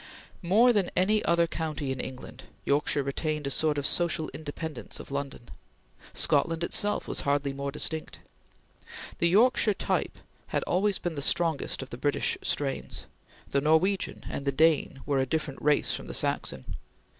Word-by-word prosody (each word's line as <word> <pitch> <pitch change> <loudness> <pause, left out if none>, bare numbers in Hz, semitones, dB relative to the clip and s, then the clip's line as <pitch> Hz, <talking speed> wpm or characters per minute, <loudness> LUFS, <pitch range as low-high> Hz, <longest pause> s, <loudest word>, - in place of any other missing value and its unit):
More 220 +8 +5
than 200 -5 +2
any 210 +4 +3
other 170 0 +4
county 155 -4 -3
in 130 - -4
England, 130 0 -7 0.2
Yorkshire 145 0 +2
retained 150 +2 -2
a 140 - -1
sort 150 +1 +2
of 145 - -1
social 170 -2 +1
independence 155 -5 -6
of - - -10
London. 140 -3 -5 0.6
Scotland 165 +3 +2
itself 205 +4 +1
was - - -2
hardly 140 -1 0
more 140 0 -4
distinct. 160 +2 -3 1.0
The 170 - +3
Yorkshire 215 +1 +4
type - - -1 0.3
had - - -1
always 195 +2 +1
been 175 - -3
the 145 - -4
strongest 160 -2 0
of 135 - -13
the 120 - -7
British 145 +1 +1
strains; 140 -2 -2 0.5
the 140 - +2
Norwegian 160 +6 +1
and - - -4
the 140 - +2
Dane 150 -2 +2
were 140 -2 +1
a 130 - +1
different 150 -1 -3
race 150 0 +2
from - - -6
the - - -5
Saxon. 65 - -1
155 Hz, 160 wpm, -28 LUFS, 140-170 Hz, 1.0 s, More